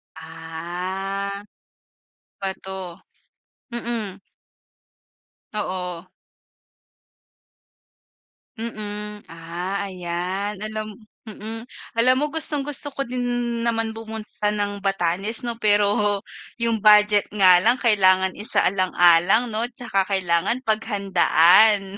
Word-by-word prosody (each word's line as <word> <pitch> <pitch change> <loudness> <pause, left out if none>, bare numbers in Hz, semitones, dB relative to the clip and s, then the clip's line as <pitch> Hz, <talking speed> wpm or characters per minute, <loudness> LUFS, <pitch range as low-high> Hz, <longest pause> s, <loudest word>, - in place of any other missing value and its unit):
Ah. 180 +5 -5 1.0
Bato. 190 -2 -6 0.7
Mm. 230 -5 -4 1.3
Oo. 180 -4 -4 2.5
Mm. 210 -2 -6
Ah, 170 +4 -5
ayan. 185 +3 -4
Alam 215 0 -6 0.2
mm. 220 +1 -8 0.3
Alam 255 +2 +5
mo, - - +2
gustong-gusto 295 -2 -1
ko 275 - -3
din 250 -1 -3 0.4
naman 225 -1 -1
pumunta 220 -1 -4
ng 205 -1 -2
Batanes 195 +2 0
'no, 235 -1 -4
pero 205 -1 +2 0.4
yung 230 -1 +1
budget 210 -1 +5
nga 185 -3 +6
lang 235 +8 +2
kailangan 190 -5 +3
isaalang-alang 190 +1 +3
'no 220 +1 -2
tsaka 220 -6 -1
kailangan 190 +4 0
paghandaan. 200 -2 +3
205 Hz, 80 wpm, -23 LUFS, 185-220 Hz, 2.5 s, nga